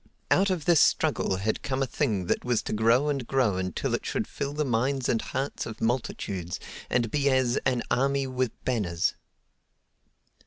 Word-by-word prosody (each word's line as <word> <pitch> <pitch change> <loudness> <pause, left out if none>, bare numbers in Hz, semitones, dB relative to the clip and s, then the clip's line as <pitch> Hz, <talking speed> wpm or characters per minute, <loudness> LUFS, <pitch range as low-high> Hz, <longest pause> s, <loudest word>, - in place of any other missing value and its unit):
Out 195 +1 +4
of 180 -5 -1
this 170 -3 +5
struggle 95 - +2
had 105 +4 -1
come 135 -1 -1
a - - +1
thing 105 -6 -1
that - - 0
was 125 -2 +1
to - - -3
grow 115 +6 +3
and 140 -5 -1
grow 125 -8 +2
until 95 -2 -2
it - - -1
should - - -1
fill 140 - -4
the 150 +1 -1
minds 130 +2 0
and 115 - +1
hearts 135 +2 -3
of 110 - -8
multitudes 100 -7 -2 0.3
and 115 -3 +1
be 140 -1 +2
as 130 -1 +2
"an 125 -3 +1
army 135 +2 +2
with 130 -1 -1 0.2
banners." 95 -8 0
125 Hz, 180 wpm, -27 LUFS, 110-135 Hz, 0.3 s, this